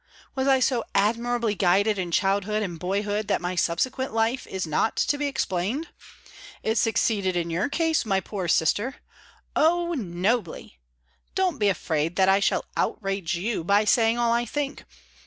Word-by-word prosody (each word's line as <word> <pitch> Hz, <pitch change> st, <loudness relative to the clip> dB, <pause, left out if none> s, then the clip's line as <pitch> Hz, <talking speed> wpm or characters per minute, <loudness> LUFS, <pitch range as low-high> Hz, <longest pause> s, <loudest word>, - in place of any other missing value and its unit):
Was 265 Hz, 0 st, -1 dB
I 265 Hz, -1 st, +5 dB
so 250 Hz, -2 st, +1 dB
admirably 230 Hz, +2 st, +1 dB
guided 200 Hz, +2 st, +2 dB
in 180 Hz, -2 st, -2 dB
childhood 200 Hz, +4 st, +1 dB
and 175 Hz, -5 st, -5 dB
boyhood 205 Hz, +3 st, -1 dB
that -, -, +1 dB
my 180 Hz, 0 st, -3 dB
subsequent 220 Hz, +10 st, -1 dB
life 225 Hz, +3 st, 0 dB
is 190 Hz, -2 st, -3 dB
not 155 Hz, +8 st, 0 dB
to -, -, +1 dB
be 290 Hz, 0 st, -1 dB
explained? 240 Hz, -, -2 dB, 0.7 s
It 220 Hz, 0 st, +1 dB
succeeded 205 Hz, -4 st, +1 dB
in 170 Hz, -1 st, -1 dB
your 180 Hz, +10 st, 0 dB
case, 325 Hz, +1 st, +1 dB
my 195 Hz, -3 st, +1 dB
poor 190 Hz, -2 st, -5 dB
sister. 205 Hz, -, +1 dB, 0.6 s
Oh, 345 Hz, +2 st, +2 dB
nobly! 200 Hz, -, -2 dB, 0.6 s
Don't 370 Hz, -6 st, 0 dB
be 205 Hz, -1 st, +3 dB
afraid 160 Hz, -2 st, -1 dB
that 190 Hz, 0 st, +4 dB
I 195 Hz, +1 st, +5 dB
shall 200 Hz, -, +1 dB
outrage 195 Hz, -4 st, -1 dB
you 190 Hz, +1 st, -2 dB
by 200 Hz, +4 st, +3 dB
saying 225 Hz, +1 st, +3 dB
all 235 Hz, -1 st, +2 dB
I 235 Hz, 0 st, +1 dB
think. 280 Hz, +4 st, -4 dB
210 Hz, 160 wpm, -25 LUFS, 185-240 Hz, 0.7 s, I